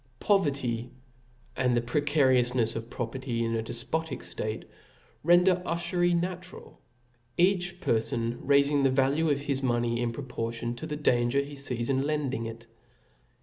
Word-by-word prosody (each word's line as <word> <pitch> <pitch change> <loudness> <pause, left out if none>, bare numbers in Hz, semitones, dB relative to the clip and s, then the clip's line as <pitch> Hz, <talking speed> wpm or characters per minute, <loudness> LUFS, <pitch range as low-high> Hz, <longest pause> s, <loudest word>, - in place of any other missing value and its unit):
Poverty 140 - +1 0.7
and 125 -1 +2
the - - +2
precarioufnefs 130 -3 +2
of 115 +1 -5
property 120 0 -3
in 115 - -1
z 115 - 0
defpotic 130 +6 -3
ftate 110 +1 -4 0.6
render 175 +2 +5
ufury 175 0 0
natural, 180 +1 -6 0.6
each 180 -1 +2
perfon 115 -3 -1
raif 140 0 +4
iog 145 0 +1
the 135 - +4
value 135 +5 +2
of 145 -1 +1
his 140 -2 -1
money 120 -2 0
in 120 -1 0
proportion 115 -2 -4
to 160 - -5
the 150 -1 -3
danger 120 -2 +2
he 140 0 -2
lees 125 -4 -3
in 135 -1 +1
lending 140 -5 -1
it. 115 +1 -9
135 Hz, 145 wpm, -28 LUFS, 120-155 Hz, 0.7 s, render